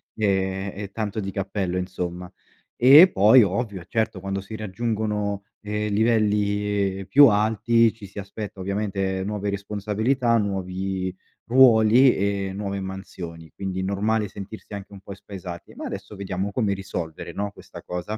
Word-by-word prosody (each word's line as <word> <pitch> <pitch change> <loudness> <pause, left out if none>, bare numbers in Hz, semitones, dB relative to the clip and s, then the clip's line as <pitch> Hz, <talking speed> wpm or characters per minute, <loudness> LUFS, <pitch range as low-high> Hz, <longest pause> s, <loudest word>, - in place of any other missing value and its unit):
ehm, 95 -2 0
eh, 100 0 -6
tanto 110 0 -3
di 95 -2 -3
cappello, 95 -2 -2
insomma. 90 -1 -4 0.5
E 145 +9 +9
poi, 110 +5 +7
ovvio, 100 -2 -2
certo, 110 -1 -2
quando 95 0 -3
si 100 +3 -8
raggiungono, 105 -1 -2 0.2
ehm, 105 0 -3
livelli 105 -3 +1
più 145 0 +8
alti, 110 +2 +3
ci 110 -2 -12
si 100 - -9
aspetta 100 0 -7
ovviamente 95 -1 -2
nuove 105 0 -2
responsabilità, 105 +5 0
nuovi 95 -2 -2 0.4
ruoli 125 0 +6
e 100 -1 -1
nuove 100 -1 -3
mansioni, 90 -4 -8
quindi 95 -1 -4
normale 105 +2 0
sentirsi 100 +2 -9
anche 100 0 -8
un 95 - -11
po' 100 - -9
spaesati. 95 -3 -9
Ma - - -8
adesso 105 - -7
vediamo 95 0 -3
come 105 -4 +1
risolvere, 90 -5 -6
no, 100 0 -3
questa - - -13
cosa. 90 +5 -5
100 Hz, 140 wpm, -24 LUFS, 95-110 Hz, 0.5 s, E